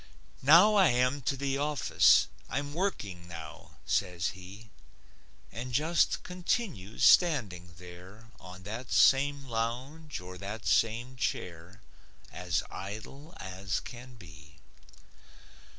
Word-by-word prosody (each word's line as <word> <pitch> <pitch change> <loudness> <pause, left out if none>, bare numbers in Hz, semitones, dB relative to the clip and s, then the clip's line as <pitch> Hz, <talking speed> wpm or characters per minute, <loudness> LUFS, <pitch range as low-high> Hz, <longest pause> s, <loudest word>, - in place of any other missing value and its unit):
"Now 170 +10 +7
I 195 -3 +5
am 125 +2 +1
to 135 - -2
the 140 0 -2
office. 150 0 +4 0.2
I'm 145 +1 -3
working 105 - -3
now," 80 -4 -10
says 90 -2 0
he, 95 +4 -12 0.8
And 120 +4 -7
just 155 +6 +1
continues 180 - -3
standing 100 - +3
there 90 +6 -13
On 90 0 -12
that 115 +5 -7
same 140 +1 +4
lounge 130 +6 -4
or 90 0 -10
that 100 +2 -7
same 120 +3 +1
chair, 90 -1 -5 0.5
As 85 -2 -2
idle 110 - -8
as 95 0 -4
can 125 +1 -11
be. 75 -7 -15
115 Hz, 110 wpm, -30 LUFS, 90-140 Hz, 0.8 s, Now